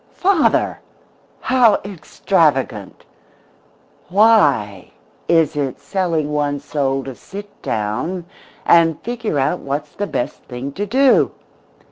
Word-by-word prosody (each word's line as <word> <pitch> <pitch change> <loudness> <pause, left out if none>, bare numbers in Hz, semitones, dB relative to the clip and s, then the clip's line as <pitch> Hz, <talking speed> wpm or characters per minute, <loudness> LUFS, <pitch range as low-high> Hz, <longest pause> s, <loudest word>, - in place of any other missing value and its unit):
"Father! 365 -4 +2 0.6
How 245 -5 +4
extravagant! 150 - -1 1.0
Why 145 - +3 0.4
is 165 -4 +3
it 140 -3 -2
selling 165 -6 -1
one's 145 -1 -2
soul 135 -2 -1
to 135 - -7
sit 200 +10 -11
down 115 - -3 0.4
and 165 -2 +4
figure 230 -8 -3
out 140 +6 0
what's 145 +2 -4
the 205 - -3
best 120 - -3
thing 125 +3 -6
to 205 +8 -4
do?" 265 +5 +3
155 Hz, 105 wpm, -19 LUFS, 135-200 Hz, 1.0 s, How